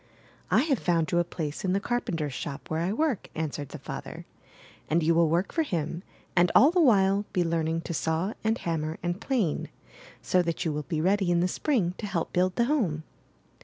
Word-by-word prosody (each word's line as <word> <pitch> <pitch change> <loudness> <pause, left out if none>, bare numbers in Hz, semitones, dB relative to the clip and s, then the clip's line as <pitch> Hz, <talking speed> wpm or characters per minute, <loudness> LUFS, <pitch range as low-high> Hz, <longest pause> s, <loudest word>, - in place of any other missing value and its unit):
'T 265 - +4
have 275 -6 +1
found 165 -3 +1
you 175 - +3
a - - +3
place 160 -3 -5
in 185 -1 +1
the 195 - +2
carpenter's 170 - -2
shop 140 +3 -6
where 160 - 0
I 175 +3 0
work," 270 -2 -1
answered 145 -3 -3
the - - -7
father. - - -7 0.6
*'And 165 +1 +2
you 165 +2 +4
will 165 -1 +4
work 175 +4 +1
for 330 - +1
him, 170 - -2 0.3
and 175 -1 +4
all 285 +5 +7
the 360 0 +3
while 200 -6 +4
be 180 - +2
learning 165 -1 0
to 170 - -5
saw 165 +6 -1
and 220 +1 +1
hammer 160 -1 -2
and 175 +4 -2
plane, 225 - 0 0.5
so 180 - +2
that 170 -1 -2
you 160 - 0
will 150 -2 -4
be 155 -2 0
ready' 190 +1 +2
in 175 -1 +3
the 180 - +2
Spring 190 - 0
to 210 - -4
help 175 -4 -2
build 180 +1 +2
the 235 - +2
home." 205 - 0
175 Hz, 210 wpm, -27 LUFS, 160-205 Hz, 0.6 s, all